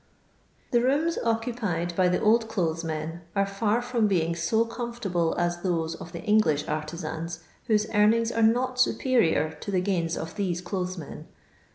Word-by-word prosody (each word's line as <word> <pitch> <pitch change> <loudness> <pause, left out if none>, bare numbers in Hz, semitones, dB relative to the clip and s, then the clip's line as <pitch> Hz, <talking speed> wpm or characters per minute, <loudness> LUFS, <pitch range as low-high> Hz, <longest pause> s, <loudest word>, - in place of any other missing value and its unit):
The 240 - +4
rooms 290 +7 +1
occupied 225 -7 -1
by 185 0 +3
the 180 - +2
ohUlothes 210 -7 +1
men 160 +1 -4
are 200 0 +3
fiir 210 +4 0
from 240 -3 +1
being 170 -4 +1
so 220 +7 +1
comfivtable 230 -8 -2
as 175 0 0
those 165 -3 -1
of 165 +1 -9
the 170 - -6
Eng 215 0 +4
lish 150 -8 +1
artisans 160 +2 -4 0.3
whose 215 -1 +3
earnings 225 +2 +4
are 230 - 0
not 250 +3 +2
superior 225 - +2
to - - -7
the 190 -2 +1
gains 175 -3 -1
of 160 - -6
these 180 -3 -1
dothes 185 0 -3
men. 155 -4 -9
195 Hz, 165 wpm, -26 LUFS, 170-230 Hz, 0.3 s, The